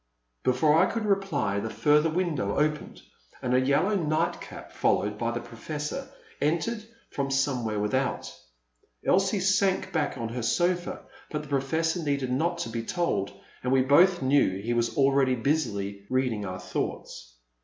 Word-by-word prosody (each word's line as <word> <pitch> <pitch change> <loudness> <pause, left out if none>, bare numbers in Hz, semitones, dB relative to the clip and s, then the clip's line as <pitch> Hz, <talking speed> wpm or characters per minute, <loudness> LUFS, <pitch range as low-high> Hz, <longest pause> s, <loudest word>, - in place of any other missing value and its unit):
'* - - -49
Before 150 +5 +4
I 185 - +4
could 230 -2 -2
reply 195 - 0
the 110 +2 -3
further 150 +5 +3
window 160 - -1
opened 150 +1 -1 0.4
and 125 -1 -1
a 130 - +5
yellow 140 +10 +2
nightcap, 160 -2 -2
followed 105 +1 0
hy 115 - 0
the 120 0 -2
Professor, 150 - -5 0.3
entered 170 +9 0 0.3
from 140 -1 -2
somewhere 125 -6 0
without. 130 +6 -1 0.7
Elsie 195 +2 +3
sank 195 0 +1
back 155 -3 0
on 115 -1 -3
her 120 +2 -4
sofa, 175 +8 0 0.3
but 150 -1 -3
the 150 - -12
Professor 160 +5 0
needed 140 -4 -1
not 170 +7 0
to 145 - -3
be 115 0 -3
told, 115 - -1 0.3
and 125 - -1
we 130 -1 +4
both 175 +5 +5
knew 130 -8 +3
he 115 +4 -2
was 120 0 0
already 135 -2 +3
busily 100 -7 -1
reading 125 -6 0
our 90 0 -5
thoughts. 90 -8 -5
140 Hz, 155 wpm, -27 LUFS, 115-165 Hz, 0.7 s, a